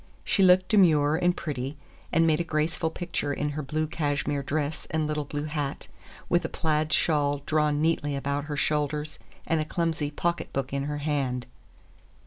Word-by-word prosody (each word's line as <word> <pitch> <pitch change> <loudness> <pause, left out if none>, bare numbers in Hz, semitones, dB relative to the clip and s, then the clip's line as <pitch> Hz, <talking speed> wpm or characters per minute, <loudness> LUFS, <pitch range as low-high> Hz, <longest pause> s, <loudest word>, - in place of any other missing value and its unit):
She 200 - +1
looked 185 0 +6
demure 155 -8 +5
and 175 +1 +2
pretty, 140 -1 -4 0.3
and 165 +1 +4
made 160 -1 +3
a - - +1
graceful 160 0 0
picture 170 -3 -3
in 145 +1 -1
her 150 +1 -3
blue 155 +3 -1
cashmere 145 -2 -1
dress 150 +2 -2
and 155 -1 0
little 150 -1 -2
blue 145 +1 -4
hat, 150 -2 -3 0.4
with 175 +1 +2
a - - -2
plaid 155 -1 0
shawl 145 -3 +2
drawn 150 -1 +2
neatly 150 -3 +1
about 140 +1 -2
her 150 -1 -4
shoulders 150 +1 -1 0.3
and 160 -1 +1
a - - +1
clumsy 160 -2 -1
pocketbook 145 -4 -2
in 140 0 -1
her 150 0 -2
hand. 140 -4 -1
150 Hz, 170 wpm, -27 LUFS, 145-160 Hz, 0.4 s, looked